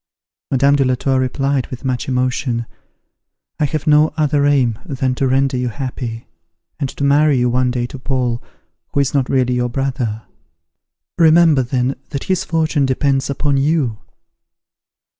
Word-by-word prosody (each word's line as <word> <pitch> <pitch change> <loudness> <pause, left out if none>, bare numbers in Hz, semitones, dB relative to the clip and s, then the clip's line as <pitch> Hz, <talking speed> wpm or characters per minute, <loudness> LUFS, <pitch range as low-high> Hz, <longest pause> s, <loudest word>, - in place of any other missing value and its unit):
Madame 140 +1 +3
de 140 - +2
la 130 -1 +1
Tour 130 +1 0
replied, 135 +1 -1
with 130 +1 -8
much 125 -2 -2
emotion, 125 -2 -1 0.9
"I 150 - +2
have 150 +1 -3
no 150 +1 +4
other 145 -2 +2
aim 125 -6 +2
than 130 -2 -2
to 135 +1 0
render 135 0 +1
you 125 0 -1
happy, 120 -2 -5 0.5
and 140 -3 -2
to 140 - -6
marry 145 0 +4
you 125 0 +1
one 125 +1 +1
day 125 -1 -1
to 125 +2 -9
Paul, 125 -3 -1 0.5
who - - +1
is 140 -2 +1
not 135 -3 +1
really 125 -2 +1
your 125 0 0
brother. 125 -4 -2 1.0
Remember 160 -3 +5
then 125 +1 -1
that 140 -2 -4
his 185 -2 0
fortune 155 -4 0
depends 135 +1 0
upon 140 0 0
you." 135 -6 0
135 Hz, 160 wpm, -18 LUFS, 125-145 Hz, 1.0 s, Remember